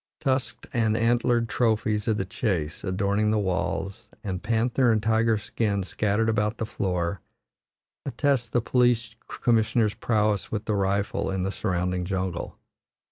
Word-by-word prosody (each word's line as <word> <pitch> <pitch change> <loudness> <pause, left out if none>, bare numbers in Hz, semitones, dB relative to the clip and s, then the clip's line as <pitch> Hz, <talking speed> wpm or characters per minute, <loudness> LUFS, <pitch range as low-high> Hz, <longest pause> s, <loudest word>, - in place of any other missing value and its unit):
Tusked 130 -3 -1
and 110 -3 +2
antlered 120 0 +2
trophies 110 -2 0
of 110 -2 +2
the 95 - -1
chase 90 -6 -2
adorning 100 +2 +1
the 110 - +2
walls, 95 0 -2
and 95 -3 -3
panther 120 +3 +2
and 110 - +3
tiger 115 0 +3
skins 105 -2 -2
scattered 105 +2 +1
about 110 0 0
the 110 - -2
floor, 90 -4 -2 0.8
attest 135 -2 0
the 120 - +2
police 120 -2 +2
commissioners' 110 -2 +1
prowess 105 -3 0
with 105 -1 -3
the 110 - 0
rifle 100 0 0
in 95 -1 -1
the 95 - -1
surrounding 90 -2 -1
jungle. 95 -1 -3
105 Hz, 140 wpm, -26 LUFS, 95-115 Hz, 0.8 s, and